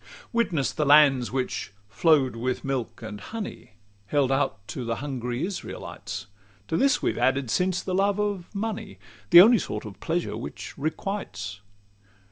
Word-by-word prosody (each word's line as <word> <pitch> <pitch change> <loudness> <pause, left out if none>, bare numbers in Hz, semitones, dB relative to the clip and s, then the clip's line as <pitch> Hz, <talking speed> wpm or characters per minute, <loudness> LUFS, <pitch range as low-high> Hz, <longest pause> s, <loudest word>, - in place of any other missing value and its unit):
C - - -24 0.3
Witness 175 - +1
the 150 - -1
lands 140 -4 +5
which 130 -5 -3
"flow'd 140 +1 +3
with 125 +2 -2
milk 130 -4 -3
and 105 -2 -7
honey," 220 - -7 0.3
Held 135 +2 +2
out 135 +1 +1
unto 115 +4 -6
the 115 -1 -1
hungry 125 +1 -3
Israelites; 195 0 -6 0.4
To - - 0
this 275 +8 +3
we - - +3
have - - -6
added 135 -2 +1
since, 180 -1 +1
the 185 - -3
love 200 +1 +2
of 205 -4 -1
money, 215 0 -4 0.3
The 175 -1 +11
only 230 +3 +7
sort 105 - -4
of 100 -2 -9
pleasure 170 +1 -2
which - - -7
requites. 140 - -4
145 Hz, 160 wpm, -26 LUFS, 125-190 Hz, 0.4 s, The